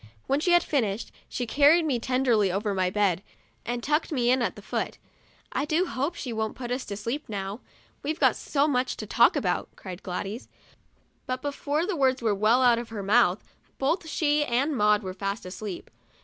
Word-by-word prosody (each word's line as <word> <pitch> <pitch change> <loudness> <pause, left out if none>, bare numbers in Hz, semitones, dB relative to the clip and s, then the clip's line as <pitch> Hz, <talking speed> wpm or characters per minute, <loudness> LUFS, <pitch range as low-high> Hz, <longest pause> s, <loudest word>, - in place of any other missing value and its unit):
When 275 - +1
she 350 +3 +2
had 350 0 +5
finished, 225 -7 -1 0.2
she 245 - -3
carried 295 +7 +5
me 265 -6 +1
tenderly 240 -5 +2
over 205 +3 -1
to - - -2
my 185 -1 +1
bed, 195 -2 +1 0.5
and 240 0 -2
tucked 300 +3 0
me 245 -4 +2
in 255 0 +3
at - - -1
the - - -12
foot. - - -3 0.3
" - - -31
I - - -1
do 320 +4 +1
hope 295 +1 -2
she 250 -7 -5
won't 220 -1 -2
put 245 -2 -6
us 255 +1 -2
to 200 - -5
sleep 235 +8 -4
now; 200 +1 -4 0.4
we've 310 +2 -3
got - - +4
so 285 0 0
much 255 -3 0
to - - -5
talk - - +4
about," - - -1
cried 185 -1 -8
Gladys; 195 +5 -5 0.8
but 255 0 -3
before 290 +2 -1
the 395 -1 -2
words 265 -3 +2
were 225 -3 +1
well 215 +6 +3
out 240 -2 +5
of 235 - -7
her 215 -3 -5
mouth, 200 -2 +3 0.3
both 320 +5 0
she 295 -1 +2
and 275 +3 0
Maud 210 -2 +3
were 185 -1 -4
fast 200 +2 -4
asleep. 185 0 -7
245 Hz, 205 wpm, -27 LUFS, 210-285 Hz, 0.8 s, had